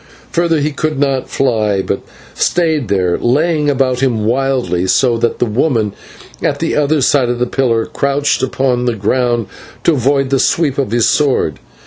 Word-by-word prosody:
Further 165 -2 +1
he 150 +1 0
could 155 +1 -2
not 135 -2 0
fly, 110 -7 0
but - - -2 0.3
stayed 160 -7 0
there, 90 -3 0
laying 150 +4 +1
about 130 -2 +1
him 120 -5 0
wildly, 120 -8 0
so 120 +5 +2
that 115 - 0
the - - +1
woman 115 -2 0 0.5
at - - 0
the - - -2
other 150 0 +1
side 130 -1 +2
of 120 - -1
the 125 - 0
pillar 120 -3 0
crouched 140 +1 0
upon 130 -1 0
the 120 -2 0
ground 120 +2 0 0.4
to 170 - +3
avoid 135 0 +1
the 135 - +2
sweep 145 -3 +1
of 135 - -1
his 115 +1 +2
sword. 130 - +1
130 Hz, 170 wpm, -15 LUFS, 115-145 Hz, 0.5 s, to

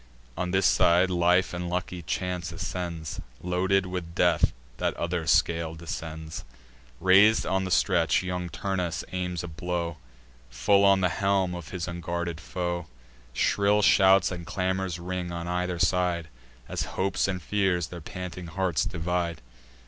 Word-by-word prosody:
On 90 - -2
this 95 0 +2
side, 90 +2 +4
life 90 +1 +3
and 90 0 -3
lucky 90 0 -3
chance 90 +1 -3
ascends; 85 -3 -4 0.2
Loaded 95 +2 +1
with 90 -2 -5
death, - - +3 0.3
that - - -1
other 85 -1 -2
scale 80 0 +2
descends. 80 -1 -6 0.6
Rais'd 100 +5 +5
on 95 0 0
the - - -3
stretch, 90 -2 +3
young 90 -1 -3
Turnus 90 -1 -2
aims 90 -2 -3
a - - -5
blow 85 0 -3 0.5
Full 100 +11 +3
on 100 -1 +5
the 90 - +3
helm 95 -1 +1
of 90 -2 -7
his 90 -1 -4
unguarded 85 -1 -3
foe: 85 -1 -3 0.4
Shrill 100 +11 +2
shouts 95 -2 +5
and 90 -1 -5
clamours 95 -1 -2
ring 90 0 -4
on 85 0 -5
either 90 0 -1
side, 90 -1 +1 0.4
As - - -3 0.2
hopes 95 0 +1
and 95 -1 -2
fears 90 -2 0
their 90 -1 -8
panting 90 +1 -7
hearts 90 -1 0
divide. 85 0 -2
90 Hz, 145 wpm, -27 LUFS, 85-95 Hz, 0.6 s, Rais'd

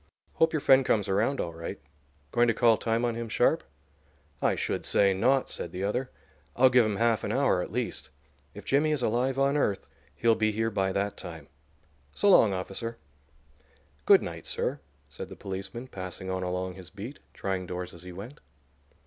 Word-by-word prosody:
Hope 160 0 +3
your 155 - 0
friend 135 0 +6
comes 105 -5 +1
around 110 +8 +1
all 85 - -2
right. 85 0 -6 0.5
Going 120 0 +3
to 115 - +2
call 115 -2 +5
time 115 +2 0
on 120 - 0
him 115 0 -5
sharp?" - - +2 0.8
"I - - +2
should - - -2
say 100 -1 +3
not!" 125 +8 +2
said 85 - -4
the 90 +2 -4
other. 125 +6 -1 0.5
"I'll 130 +1 +5
give 125 -3 +5
him 105 - -1
half 115 +1 +2
an - - -2
hour 135 -9 +2
at - - -5
least. 120 +1 -3 0.5
If - - -10
Jimmy 150 +3 +2
is 140 -5 -1
alive 125 +4 +1
on 140 +1 +2
earth 105 -9 0 0.3
he'll 115 -1 +3
be 110 -1 +1
here 110 +1 -1
by 95 -2 0
that 100 +1 -2
time. 80 -5 -9 0.7
So 205 - +4
long, 110 - +6
officer." 95 +5 -4 1.1
"Good - - +7
night, - - -7
sir," - - -1 0.3
said - - -8
the - - -9
policeman, 95 +5 -6
passing 95 -5 -6
on 95 0 -2
along 90 0 -2
his 95 -1 -11
beat, 110 +8 -8 0.2
trying 95 -2 -3
doors 90 0 -5
as 85 - -12
he 90 0 -9
went. 110 +11 -9
110 Hz, 190 wpm, -28 LUFS, 95-125 Hz, 1.1 s, Good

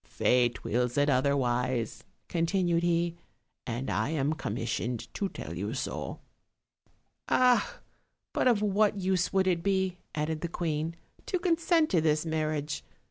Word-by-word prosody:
"Fate 120 -1 +1
wills 125 +2 0
it 145 0 +4
otherwise," 125 -3 +1 0.2
continued 170 0 +1
he, 170 0 +1 0.5
"and 120 +2 -3
I 110 +5 0
am 150 -1 +1
commissioned 115 -4 -3
to 200 - -1
tell 85 - -7
you 100 +7 -3
so." - - -4 1.1
"Ah! 250 -1 +3 0.6
but - - +2
of 220 -4 +3
what 205 0 +2
use 185 -2 +1
would 190 -1 +3
it 175 -3 +1
be," 190 -1 0 0.2
added 155 0 -1
the 170 - -1
queen, 160 -1 -2 0.3
"to 370 - +1
consent 335 -2 +2
to 170 - +4
this 155 0 +2
marriage? 155 -2 -2
160 Hz, 135 wpm, -29 LUFS, 130-190 Hz, 1.1 s, it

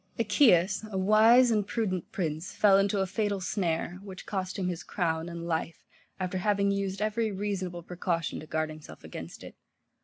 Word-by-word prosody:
Achaeus, 205 - +4
a 190 - -2
wise 220 +5 +6
and 210 -3 +1
prudent 190 -7 -2
prince, 160 -1 -3
fell 195 -2 +5
into 200 0 +1
a - - +1
fatal 205 +1 -1
snare, 180 -2 -2
which 190 -2 -10
cost 190 -1 -3
him 185 -2 -1
his 175 -2 -3
crown 165 -3 -2
and 170 0 -6
life, 165 0 -3 0.3
after 185 0 -2
having 200 0 +2
used 200 0 -2
every 215 +1 0
reasonable 190 -3 -3
precaution 170 -1 -2
to 155 - -10
guard 155 0 -1
himself 155 -1 -12
against - - -9
it. - - -10
190 Hz, 175 wpm, -29 LUFS, 175-205 Hz, 0.3 s, wise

